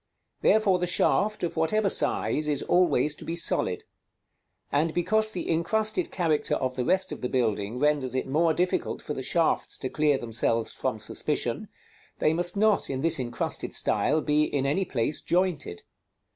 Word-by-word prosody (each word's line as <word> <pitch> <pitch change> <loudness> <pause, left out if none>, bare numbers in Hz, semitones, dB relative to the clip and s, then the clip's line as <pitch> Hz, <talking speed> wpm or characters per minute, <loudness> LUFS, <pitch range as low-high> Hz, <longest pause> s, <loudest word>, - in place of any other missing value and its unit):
Therefore 205 -4 +3
the 180 - -1
shaft, 210 +4 +1
of 175 - -2
whatever 195 +6 +1
size, 155 -5 +1
is 145 -2 0
always 155 -5 +2
to - - -12
be 165 - -4
solid; 170 - -1 0.9
and 155 +3 +1
because 215 +5 +1
the 185 - -5
incrusted 215 - +1
character 165 -5 0
of 130 -1 -2
the 125 - -1
rest 190 +8 +1
of - - -6
the 125 - -2
building 110 -3 -1
renders 140 -2 +1
it 130 - -1
more 160 +5 +2
difficult 180 +3 -1
for 150 - -4
the 135 - -5
shafts 165 +5 +1
to 130 - -4
clear 150 -1 +2
themselves 115 -1 -1
from - - -2
suspicion, - - -2 0.5
they 155 - +2
must 175 +3 -3
not, 215 0 +2
in 130 -1 -3
this 165 -1 +2
incrusted 120 -2 -3
style, 155 +3 +1
be 150 0 +2
in 140 -3 -1
any 185 +8 +1
place 130 0 -2
jointed. 175 - -1
155 Hz, 170 wpm, -27 LUFS, 135-180 Hz, 0.9 s, Therefore